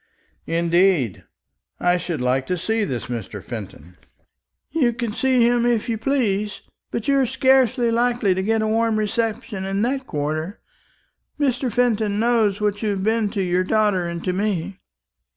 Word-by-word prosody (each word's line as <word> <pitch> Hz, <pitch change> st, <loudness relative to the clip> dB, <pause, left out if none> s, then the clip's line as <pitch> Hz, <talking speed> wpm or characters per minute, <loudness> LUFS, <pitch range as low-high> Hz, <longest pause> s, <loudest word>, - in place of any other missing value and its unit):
"Indeed! 170 Hz, -, +2 dB, 0.5 s
I 180 Hz, 0 st, +2 dB
should 170 Hz, -5 st, -4 dB
like 130 Hz, +1 st, 0 dB
to 180 Hz, -, -1 dB
see 220 Hz, +5 st, 0 dB
this 130 Hz, -, -3 dB
Mr. 110 Hz, -5 st, -6 dB
Fenton." 90 Hz, -6 st, -9 dB, 0.7 s
"You 265 Hz, -6 st, +2 dB
can 235 Hz, -3 st, -3 dB
see 255 Hz, -1 st, +3 dB
him 240 Hz, 0 st, +2 dB
if 235 Hz, -1 st, +1 dB
you 225 Hz, -2 st, -1 dB
please; 210 Hz, -6 st, 0 dB, 0.3 s
but 225 Hz, -, -4 dB
you 275 Hz, -1 st, +3 dB
are 265 Hz, -, +2 dB
scarcely 260 Hz, -1 st, +3 dB
likely 235 Hz, -4 st, +2 dB
to 185 Hz, -, -1 dB
get 220 Hz, +2 st, +1 dB
a -, -, 0 dB
warm 225 Hz, 0 st, +1 dB
reception 215 Hz, -1 st, -2 dB
in 195 Hz, +2 st, -1 dB
that 265 Hz, +2 st, -1 dB
quarter. 155 Hz, +6 st, -3 dB, 0.8 s
Mr. 260 Hz, -3 st, 0 dB
Fenton 220 Hz, -3 st, +1 dB
knows 225 Hz, -4 st, +2 dB
what 210 Hz, -1 st, -1 dB
you 215 Hz, -, 0 dB
have 195 Hz, -2 st, -2 dB
been 220 Hz, 0 st, +1 dB
to 200 Hz, -2 st, -2 dB
your 180 Hz, 0 st, +1 dB
daughter 205 Hz, -3 st, +1 dB
and 170 Hz, 0 st, -5 dB
to 185 Hz, -, -1 dB
me." 195 Hz, -1 st, -2 dB
210 Hz, 165 wpm, -22 LUFS, 180-235 Hz, 0.8 s, see